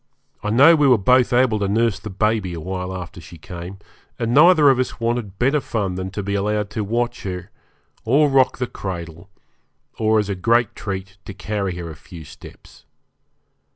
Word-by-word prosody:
I 105 - -3
know 140 +9 +6
we 150 -3 +3
were 125 -3 +6
both 125 +5 +3
able 120 -3 +3
to 100 - 0
nurse 110 0 +1
the 110 +2 -8
baby 105 -2 -1
a - - -6
while 90 +2 -5
after 90 -1 -9
she 85 +1 -13
came, 90 +4 -9 0.4
and 115 0 -2
neither 155 -1 +6
of 130 - 0
us 130 - -2
wanted 115 -4 -2
better 140 +4 +2
fun 100 -7 -2
than 95 +1 -4
to 100 +2 -5
be 100 +1 -3
allowed 105 0 -1
to 110 - -3
watch 120 +4 -2
her, 90 -2 -6 0.5
or 140 +6 +3
rock 135 -2 +3
the 125 - -1
cradle, 85 -4 -7 0.7
or 110 0 +2
as 105 -2 +1
a 100 - -2
great 115 +4 +1
treat 95 -1 -6
to 100 - -8
carry 100 -3 -3
her 85 -2 -6
a - - -10
few 85 +1 -12
steps. 70 - -15
105 Hz, 190 wpm, -21 LUFS, 95-120 Hz, 0.7 s, know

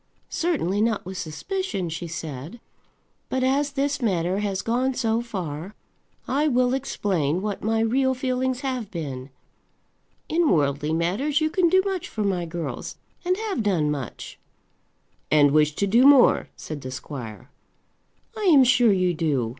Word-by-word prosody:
"Certainly 230 - 0
not 220 -4 0
with 185 0 -6
suspicion," 195 - -3
she 165 +1 -5
said. 160 - -7 0.7
"But 260 0 0
as 280 +2 +1
this 285 0 -1
matter 185 -3 0
has 200 -2 -2
gone 250 +3 0
so 230 -2 0
far, 185 -4 -6 0.5
I 290 +3 +1
will 250 -2 +2
explain 190 - -1
what 210 -2 -3
my 225 +1 +1
real 260 +3 +2
feelings 255 0 -1
have 255 -6 -3
been. 140 -8 -6 1.0
In 330 0 +2
worldly 145 -1 +1
matters 195 - 0
you 310 0 0
can 350 0 +3
do 375 +2 +4
much 385 -3 -3
for 215 - -3
my 180 -4 -1
girls, 170 0 -5 0.3
and 365 +1 +1
have 425 - -2
done 175 -8 +1
much." 135 -6 -6 0.9
"And 145 -2 +5
wish 150 0 +3
to 200 - +1
do 235 +7 +5
more," 280 -3 +5
said 155 -2 -7
the 130 - -6
squire. 130 -2 -8 0.8
"I 430 -2 -3
am 300 -8 +7
sure 245 -3 +5
you 185 -2 +2
do. 145 -8 0
210 Hz, 155 wpm, -24 LUFS, 160-265 Hz, 1.0 s, am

